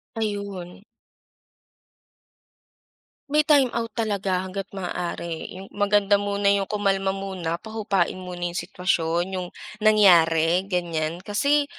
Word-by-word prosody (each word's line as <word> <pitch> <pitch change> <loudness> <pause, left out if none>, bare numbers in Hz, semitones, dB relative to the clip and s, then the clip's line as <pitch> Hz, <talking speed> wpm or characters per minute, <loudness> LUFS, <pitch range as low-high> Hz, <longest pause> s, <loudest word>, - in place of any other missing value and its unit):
Ayun. 200 -4 -4 2.5
May 300 - +5
timeout 265 -6 +3
talaga 200 -5 -1
hangga't 190 +1 -5
maaari 175 -2 -4
yung 190 +1 -10
maganda 205 0 +3
muna 200 0 +1
yung 200 -1 0
kumalma 195 -2 0
muna 190 -4 -3
pahupain 200 -3 -1
muna 175 -1 -4
yung 175 - -2
sitwasyon 175 -2 0 0.2
yung 180 - -5 0.3
nangyari, 175 -6 +5
ganyan. 170 -2 -2
Kasi 280 +9 +2
195 Hz, 100 wpm, -24 LUFS, 175-205 Hz, 2.5 s, May